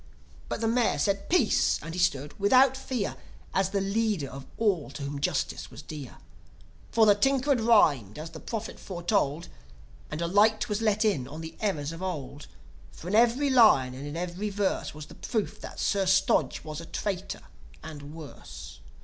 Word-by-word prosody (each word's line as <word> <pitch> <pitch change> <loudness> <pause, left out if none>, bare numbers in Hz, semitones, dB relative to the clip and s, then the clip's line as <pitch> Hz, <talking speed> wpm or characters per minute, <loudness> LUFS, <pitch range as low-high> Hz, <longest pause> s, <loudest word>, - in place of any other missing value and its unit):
But - - -3
the 225 - +1
Mayor 235 0 +2
said: 200 -1 0
Peace! 360 - +3
And 165 - -6
he 180 - -4
stood, 145 -5 +1
without 255 +6 +5
fear, 255 -6 -3 0.4
As 190 0 +2
the 200 - 0
leader 195 -7 0
of 135 0 -9
all 200 -9 +1
to 140 +1 -7
whom 140 0 -4
Justice - - -1
was - - -11
dear. 145 -5 -8 0.7
For 225 -1 +5
the 210 - +7
Tinker 270 +6 +2
had 250 -4 +3
rhymed, 150 - +4
as 160 +2 -7
the 160 - -9
Prophet 225 +3 -5
foretold, 175 -4 -1 0.6
And 150 - -5
a 170 - 0
light 215 +6 +3
was 210 0 -2
let 215 -1 +2
in 150 -13 +1
on 155 +4 -8
the 160 0 -8
errors 155 -9 -1
of 165 +2 -8
old. 150 -6 -5 0.4
For 175 - -9
in - - -3
every 240 +5 +4
line, 215 - +6
and 135 +3 -7
in 145 +3 -5
every 180 +4 -3
verse 200 -6 -1
Was 150 -1 -8
the - - -14
proof 220 -4 -3
that - - -8
Sir 195 -2 +1
Stodge 185 +1 +2
was 155 +1 -6
a 165 - -10
traitor, 195 -2 -4 0.4
and 150 -1 -9
worse! 155 -3 -10
190 Hz, 185 wpm, -28 LUFS, 155-220 Hz, 0.7 s, the